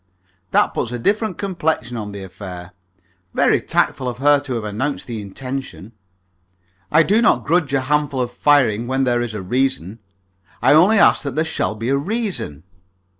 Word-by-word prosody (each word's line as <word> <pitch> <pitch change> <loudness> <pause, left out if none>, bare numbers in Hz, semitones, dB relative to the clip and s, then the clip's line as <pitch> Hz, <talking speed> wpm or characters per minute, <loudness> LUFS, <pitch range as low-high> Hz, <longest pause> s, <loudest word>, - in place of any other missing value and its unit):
"That - - +2
puts 115 - -2
a 120 - -3
different 205 - 0
complexion 160 - -2
on 105 -3 -5
the 100 -1 -7
affair. 90 -1 -9 0.6
Very - - +3
tactful 130 -1 0
of 120 - -6
her 145 +2 +4
to 140 -3 -5
have 115 - -3
announced 110 +8 -3
the 115 -3 -5
intention. 125 +1 -7 1.0
I 165 +2 +6
do 210 +7 +2
not 125 - +3
grudge 160 -3 +1
a 135 - +2
handful 145 0 0
of 125 -1 -1
firing 120 -4 +2
when 130 +1 0
there 120 -2 +1
is 115 -3 -4
a 100 - -5
reason. 125 -2 -1 0.6
I - - +4
only 185 +8 +5
ask - - +5
that 140 -4 -5
there 155 +1 +1
shall 160 -8 -2
be 115 +3 -4
a 140 - +2
reason." 185 - -3
130 Hz, 175 wpm, -20 LUFS, 110-150 Hz, 1.0 s, I